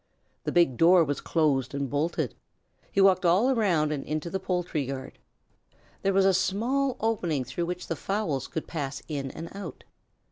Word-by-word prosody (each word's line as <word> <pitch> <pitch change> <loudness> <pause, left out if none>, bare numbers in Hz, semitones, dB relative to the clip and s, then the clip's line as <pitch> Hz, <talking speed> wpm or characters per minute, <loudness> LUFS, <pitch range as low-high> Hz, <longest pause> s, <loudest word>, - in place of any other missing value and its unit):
The - - 0
big 170 -8 +3
door 175 +1 +6
was 145 -2 -2
closed 140 -5 +1
and 140 -1 -1
bolted. 145 +6 -1 0.6
He 200 - +2
walked 190 -1 +5
all 185 +9 +4
around 180 - +2
and 145 -3 -2
into 155 +2 -3
the 190 - -1
poultry 180 -4 -1
yard. 135 -1 -6 0.8
There 195 - +2
was 195 0 +4
a 195 - +5
small 240 +9 +1
opening 175 -11 0
through 170 +7 -3
which 180 0 -4
the 165 - -3
fowls 165 - -2
could 160 - -4
pass 140 -4 -4
in 140 -3 -3
and 165 +6 -8
out. 200 -5 -7
170 Hz, 175 wpm, -27 LUFS, 145-195 Hz, 0.8 s, door